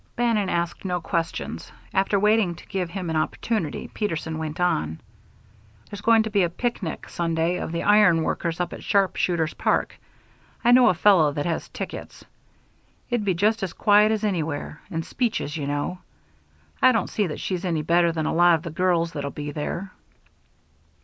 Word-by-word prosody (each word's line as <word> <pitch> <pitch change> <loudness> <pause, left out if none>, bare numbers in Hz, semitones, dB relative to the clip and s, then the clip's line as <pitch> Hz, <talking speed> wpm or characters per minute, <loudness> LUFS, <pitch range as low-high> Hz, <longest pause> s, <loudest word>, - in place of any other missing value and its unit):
Bannon 230 -5 +1
asked 170 0 -2
no 180 -2 -1
questions. 165 0 -3 0.2
After 195 +1 +2
waiting 210 -3 +3
to - - -14
give 185 -3 -3
him 180 -2 -4
an - - -2
opportunity, 160 +2 -2
Peterson 165 -6 -3
went 155 0 -5
on: 80 - 0 0.9
"There's 205 -1 -8
going 225 0 +5
to 220 - -5
be 205 -2 +3
a 175 - +2
picnic 190 -2 -4
Sunday 165 +1 -1
of - - -4
the 170 - -2
Iron 205 -6 +5
Workers 170 +1 -2
up 180 - -2
at - - -9
Sharpshooters' 180 -5 +1
Park. - - 0 0.7
I 240 - +6
know 250 0 +7
a 180 - +4
fellow 170 -5 +5
that 145 0 -2
has 170 -2 -2
tickets. - - -7 0.9
It'd 240 -3 +1
be 190 -3 +1
just 215 +5 +2
as 190 -3 -3
quiet 210 0 +4
as 220 -1 -1
anywhere 160 -7 -2
and 165 0 -3
speeches, 225 - -2
you 145 -3 -3
know. 145 +6 -2 0.8
I 255 - +7
don't 225 - +1
see 205 -3 -1
that 150 - -5
she's 185 -1 -3
any 165 -4 -1
better 170 +2 +3
than 160 -1 -2
a - - 0
lot 175 0 +5
of 160 - -5
the 165 - -5
girls 170 -1 +1
that'll 140 -2 -3
be 145 +1 -6
there." 170 +6 -4
175 Hz, 180 wpm, -24 LUFS, 160-205 Hz, 0.9 s, know